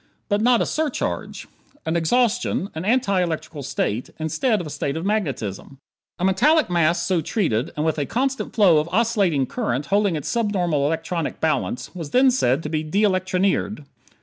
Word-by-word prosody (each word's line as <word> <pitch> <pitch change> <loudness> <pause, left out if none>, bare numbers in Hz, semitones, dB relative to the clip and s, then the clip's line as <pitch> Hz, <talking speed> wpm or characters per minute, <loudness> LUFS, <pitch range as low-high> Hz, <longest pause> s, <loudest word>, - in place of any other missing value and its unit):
But 205 0 +1
not 240 0 +4
a - - -2
surcharge. 310 -4 -3 0.4
An 160 - -1
exhaustion. 225 +3 +1
An 160 +3 -5
anti 210 -5 +2
electrical 160 -3 -3
state, 130 -4 -2
instead 210 - 0
of 175 - -5
a 150 - -7
state 140 +2 -3
of 165 - -4
magnetism. 135 - -3 0.4
A 180 - -1
metallic 250 - +3
mass 170 0 +2
so 185 -4 +1
treated 155 - -1
and 150 - 0
with 160 -1 0
a 145 - -1
constant 270 +2 -2
flow 185 -8 +5
of 155 +2 -3
oscillating 200 - +2
current 130 +3 -2
holding 200 -4 +3
its 150 - -4
subnormal 180 -11 0
electronic 165 +1 -3
balance 150 -5 -1
was 165 -5 -6
then 260 - +4
said 165 - +1
to 150 - -4
be 155 -1 -1
de 185 +7 0
electronired. 185 -2 0
175 Hz, 175 wpm, -22 LUFS, 155-215 Hz, 0.4 s, flow